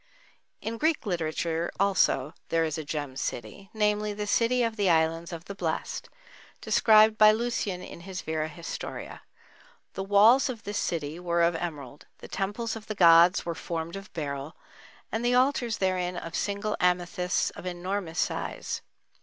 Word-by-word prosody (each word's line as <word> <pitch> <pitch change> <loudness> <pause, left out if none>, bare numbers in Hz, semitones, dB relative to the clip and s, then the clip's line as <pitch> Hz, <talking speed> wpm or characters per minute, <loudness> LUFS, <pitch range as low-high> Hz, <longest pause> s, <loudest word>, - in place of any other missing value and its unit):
In 225 +1 -4
Greek 315 -3 +1
literature 170 -2 -1
also 190 -8 +2 0.2
there 165 0 +2
is 155 -2 -1
a - - -4
"gem 145 -3 -4
city,"—namely, 210 - -2
the 210 0 -3
city 230 +4 +2
of 230 -1 -1
the 200 -3 +1
Islands 165 0 +1
of 170 0 -7
the 200 - -6
Blessed, 170 -5 -3 0.5
described 215 0 +5
by 215 0 +9
Lucian 215 -5 -2
in - - -9
his 185 +1 -7
Vera 155 0 -2
Historia. 170 +1 -7 0.7
The - - -4
walls 215 +8 +5
of 230 -3 -6
this 205 0 -3
city 160 -1 -3
were 170 -1 +1
of 170 0 +3
emerald, 150 -5 -6
the - - -11
temples 220 +4 -3
of 220 -1 -9
the 215 - -4
gods 170 +1 +6
were 170 - -2
formed 165 +1 -5
of 195 +1 -9
beryl, 145 0 -5 0.5
and 225 +2 -2
the 245 +1 +3
altars 250 -3 +2
therein 185 -2 0
of 165 -1 -6
single 205 +1 -1
amethysts 180 0 +1
of 185 - -9
enormous 180 -1 -4
size. - - -2
180 Hz, 160 wpm, -28 LUFS, 165-210 Hz, 0.7 s, by